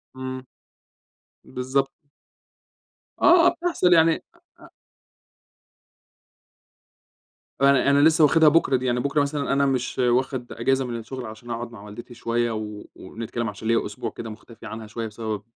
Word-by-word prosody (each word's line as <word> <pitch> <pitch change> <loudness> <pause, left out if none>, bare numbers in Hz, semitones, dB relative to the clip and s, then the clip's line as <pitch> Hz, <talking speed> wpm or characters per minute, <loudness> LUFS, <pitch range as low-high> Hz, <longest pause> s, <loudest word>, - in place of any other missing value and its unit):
إمم. 130 0 -6 1.0
بالضبط. 135 +2 -2 1.3
آه 350 0 +6
بتحصل، 335 - +1
يعني 165 -1 +5 0.4
أ - - -20
أ - - -14 2.9
فعلًا 140 0 +4
أنا 140 0 +4
لسه 160 +2 +5
واخدها 155 +1 +6
بُكرة 150 -3 +3
دي، 130 0 0
أنا 120 - 0
بُكرة 140 +3 +1
مثلًا 140 0 -1
أنا 140 0 +2
مش 130 -2 -1
واخد 125 0 0
أجازة 135 +3 0
من 120 -2 -4
الشغل 125 +3 -7
عشان 110 +2 -10
أقعُد 115 0 -5
مع 110 -4 -12
والدتي 105 +4 -10
شوية 120 0 -1
و 105 -1 -6
ونتكلّم 115 +3 -5
عشان 105 +2 -8
ليّا 115 0 +2
أسبوع - - -5
كده 115 - -8
مُختفيي 110 +1 -11
عنها 110 -1 -8
شوية 115 +1 -5
بسبب 110 -1 -5
125 Hz, 145 wpm, -24 LUFS, 115-140 Hz, 2.9 s, آه